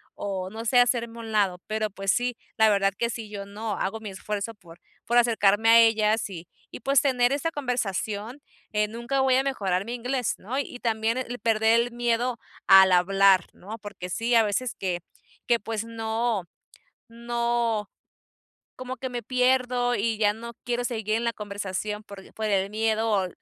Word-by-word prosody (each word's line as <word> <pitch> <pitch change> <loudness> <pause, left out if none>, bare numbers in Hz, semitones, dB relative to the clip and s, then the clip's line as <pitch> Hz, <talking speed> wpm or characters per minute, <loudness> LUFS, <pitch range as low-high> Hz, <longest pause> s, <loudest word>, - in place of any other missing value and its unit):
o 190 -2 -4
no 225 +3 -7
sé, 245 +2 +4
hacerme 235 -1 +1
a - - -6
un 225 -1 -7
lado, 195 -4 +1
pero 215 0 -1
pues 195 0 0
sí, 245 0 0 0.2
la 220 -1 +5
verdad 195 -1 +2
que 235 - 0
si 225 -2 -7
yo 200 -1 -6
no 210 +2 -5
hago 210 +4 -2
mi 220 -1 -7
esfuerzo 210 +3 -4
por 175 -4 -16 0.3
por 240 - +2
acercarme 225 -2 +4
a 230 0 +8
ellas 220 -1 +3
y 175 -3 -9 0.2
y - - -9
pues 275 +3 +3
tener 250 -3 +2
esta 285 +3 0
conversación, 230 - -3 0.3
eh, 210 0 +2
nunca 235 +5 -2
voy 265 -1 +3
a - - +4
mejorar 195 -9 -1
mi 235 +2 -4
inglés, 245 0 -1
¿no? 250 +8 -4
Y 275 - -5
también 225 0 0 0.2
perder 225 0 +3
el 240 +1 -3
miedo 240 +1 0 0.3
al 190 -1 +8
hablar, 190 0 +4
¿no? 215 +5 -9
Porque 205 -3 -8
sí, 230 +6 0
a 225 - +6
veces 220 +4 -1
que 180 -2 -2 0.5
que 235 -1 +3
pues 225 -1 -4
no 225 -2 -2 0.7
no, 235 -2 -1 0.9
como 255 0 -6
que 260 +2 -4
me 240 -1 -5
pierdo, 250 0 +1
y 225 +1 0
ya 205 -1 +3
no 235 +2 -9
quiero 245 0 -1
seguir 220 -3 -1
en 230 - -1
la 235 0 0
conversación 210 0 -4
porq 200 -2 -12
por 220 - -4
el 195 -2 +1
miedo 220 +1 0
o 195 -3 +2
225 Hz, 185 wpm, -26 LUFS, 205-240 Hz, 0.9 s, a